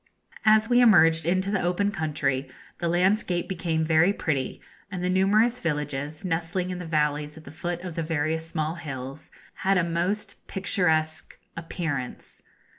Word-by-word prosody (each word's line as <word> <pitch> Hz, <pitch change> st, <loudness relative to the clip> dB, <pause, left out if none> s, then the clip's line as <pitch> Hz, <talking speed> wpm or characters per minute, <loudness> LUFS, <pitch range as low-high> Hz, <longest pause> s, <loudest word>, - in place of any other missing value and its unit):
As 215 Hz, 0 st, +5 dB
we 245 Hz, 0 st, +4 dB
emerged 165 Hz, -8 st, +5 dB
into 185 Hz, +3 st, +1 dB
the 200 Hz, -, +1 dB
open 180 Hz, +4 st, +1 dB
country 145 Hz, -6 st, -1 dB, 0.3 s
the 170 Hz, -, -1 dB
landscape 180 Hz, +1 st, +1 dB
became 165 Hz, -4 st, -1 dB
very 160 Hz, +4 st, +4 dB
pretty, 140 Hz, -9 st, -2 dB, 0.3 s
and 180 Hz, -3 st, -5 dB
the 180 Hz, -, +1 dB
numerous 215 Hz, +6 st, +3 dB
villages, 150 Hz, -, -3 dB
nestling 175 Hz, +2 st, -1 dB
in 180 Hz, -, -4 dB
the 180 Hz, -, -6 dB
valleys 150 Hz, -1 st, 0 dB
at 160 Hz, -, -11 dB
the 140 Hz, -, -11 dB
foot 175 Hz, +2 st, -4 dB
of 180 Hz, -2 st, -5 dB
the 165 Hz, -, -2 dB
various 160 Hz, 0 st, -1 dB
small 155 Hz, -1 st, -2 dB
hills, 135 Hz, -1 st, -7 dB, 0.3 s
had 195 Hz, 0 st, +2 dB
a 180 Hz, -, +3 dB
most 175 Hz, +5 st, -2 dB
picturesque 160 Hz, -5 st, 0 dB, 0.2 s
appearance. 160 Hz, -6 st, -5 dB
165 Hz, 155 wpm, -26 LUFS, 155-185 Hz, 0.3 s, As